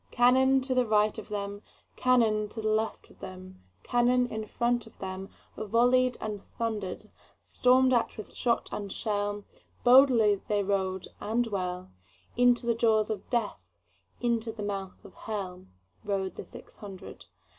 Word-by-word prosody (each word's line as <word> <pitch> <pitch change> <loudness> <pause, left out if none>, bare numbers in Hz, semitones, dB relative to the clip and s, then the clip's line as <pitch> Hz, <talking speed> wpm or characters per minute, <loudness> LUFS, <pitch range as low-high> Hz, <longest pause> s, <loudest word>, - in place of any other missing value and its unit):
Cannon 260 +2 +4
to 260 0 -1
right 215 -2 +2
of 220 - -10
them, 205 -1 -4 0.3
Cannon 225 -4 +2
to 225 - -8
left 220 0 -1
of - - -21
them, 185 0 -10 0.2
Cannon 245 +1 +3
in 220 -3 -5
front 240 0 0
of 225 - -18
themVolley'd 230 +6 0
and 210 -2 -5
thunder'd; 215 -6 -5 0.3
Storm'd 255 +1 +3
at 240 -1 +1
with 215 - -9
shot 235 -2 0
and 200 -2 -5
shell, 205 -1 -2 0.4
Boldly 245 -5 +6
they 205 -1 +1
rode 190 -1 -1
and 235 +3 0
well, 180 - -4 0.4
Into 245 0 +3
the 235 - +2
jaws 220 -2 +2
of 205 -3 -6
Death, 235 -4 -1 0.6
Into 235 -2 0
the 220 -1 -7
mouth 195 -2 -5
of - - -13
HellRode 190 - -5
the - - -8
six - - -13
hundred. 195 - -10
215 Hz, 140 wpm, -29 LUFS, 200-240 Hz, 0.6 s, Boldly